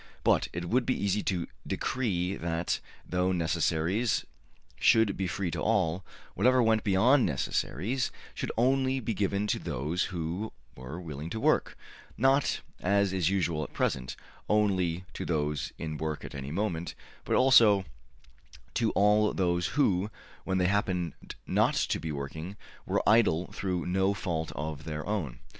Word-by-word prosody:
But - - +3
it 85 +1 -4
would 125 +6 +2
be 130 +1 -1
easy 100 +1 +1
to 90 -4 0 0.2
decree 95 -7 -1
that, 85 0 -1 0.3
though 90 +1 +1
necessaries 85 +5 +1 0.5
should 110 -3 +4
be 95 - -2
free 90 -1 -2
to - - -3
all, 85 +4 +1 0.3
whatever 125 +5 +4
went 110 -1 +3
beyond 115 +7 +4
necessaries 90 - -1 0.2
should - - -3
only 130 +2 +2
be 115 -2 -2
given 100 0 0
to 105 - 0
those 75 +8 -2
who 90 +4 -4 0.2
were 65 +7 -7
willing 80 -2 -6
to 110 - -4
work - - +1 0.4
not, 135 +3 +3 0.2
as 100 0 +2
is 90 -3 +2
usual 85 -5 0
at - - -9
present, 65 -1 -1 0.3
only 95 -5 +1
to - - -5
those 75 -3 -1
in 80 -2 -4
work 80 0 -3
at - - -8
any 70 -1 -6
moment, 85 -1 -2 0.3
but - - 0
also 115 -7 +6 0.9
to 115 -2 +1
all 105 +1 +4
those 90 -2 +1
who, 100 -8 +2 0.4
when 95 -1 0
they 90 - +2
happened 90 -4 0 0.3
not - - +2
to - - 0
be 80 - -4
working, 80 +7 -6 0.3
were - - 0
idle 105 -6 +4
through 90 -3 -2
no 95 +2 +1
fault 80 -5 -3
of 75 0 -4
their 75 -1 -4
own. 95 - -2
95 Hz, 150 wpm, -29 LUFS, 80-105 Hz, 0.9 s, also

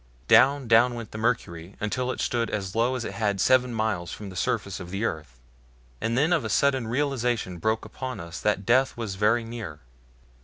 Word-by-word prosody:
Down, 135 -1 +5
down 120 +2 +5
went 115 -2 -7
the 110 - -6
mercury 95 -6 -2
until 125 +4 -2
it - - -6
stood 120 -2 0
as 95 -2 -3
low 120 +3 +2
as 120 -3 -3
it - - -5
had 105 -3 -1
seven 125 +3 +4
miles 110 -6 -2
from 100 -2 -7
the - - -11
surface 105 -2 -1
of 90 -2 -8
the 100 +4 -2
earth, 75 - -5 0.6
and 115 +1 0
then 155 +6 +3
of 165 - +1
a 110 - -3
sudden 130 +2 +2
the - - -6
realization 120 -8 -1
broke 110 +4 0
upon 125 +1 -6
us 85 0 -7
that 105 -2 0
death 130 +3 +3
was 115 -4 -3
very 105 +4 +2
near. 110 -10 -7
115 Hz, 205 wpm, -26 LUFS, 100-125 Hz, 0.6 s, Down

